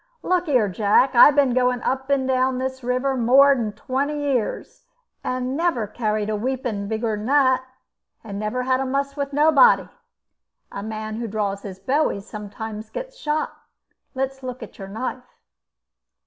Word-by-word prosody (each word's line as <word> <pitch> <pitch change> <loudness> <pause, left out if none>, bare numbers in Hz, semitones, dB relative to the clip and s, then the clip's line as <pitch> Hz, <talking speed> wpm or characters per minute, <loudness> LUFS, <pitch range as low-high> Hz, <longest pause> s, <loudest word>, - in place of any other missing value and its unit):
"Look 360 -1 +1
here, 250 -8 +3
Jack. 210 +7 +2
I've 270 +4 +8
been 275 -4 +3
going 250 -1 +1
up 265 +1 -2
and 270 -2 +1
down 260 0 +1
the 260 +1 -2
river 255 +2 0
more'n 255 -1 +4
twenty 275 +7 -2
years, 270 -6 -2 0.4
and 255 +1 -2
never 325 -8 0
carried 215 -1 -2
a 215 - -1
weepon 235 -3 -3
bigg'n 220 0 -2
that, 260 -2 +3 0.6
and 200 -3 -6
never 215 +4 -2
had 255 0 +1
a 270 - -1
muss 275 +1 -1
with 280 -1 -3
nobody. 305 - +5 0.8
A 200 - -6
man 215 0 -5
who 235 0 -3
draws 200 -2 -2
his 195 -3 -8
bowie 260 +4 0
sometimes 215 +1 -8
gets - - -7
shot. 310 -10 -2 0.6
Let's 265 0 -3
look 255 -1 -6
at - - -12
your 195 - -7
knife." 250 +4 -6
255 Hz, 155 wpm, -23 LUFS, 215-275 Hz, 0.8 s, I've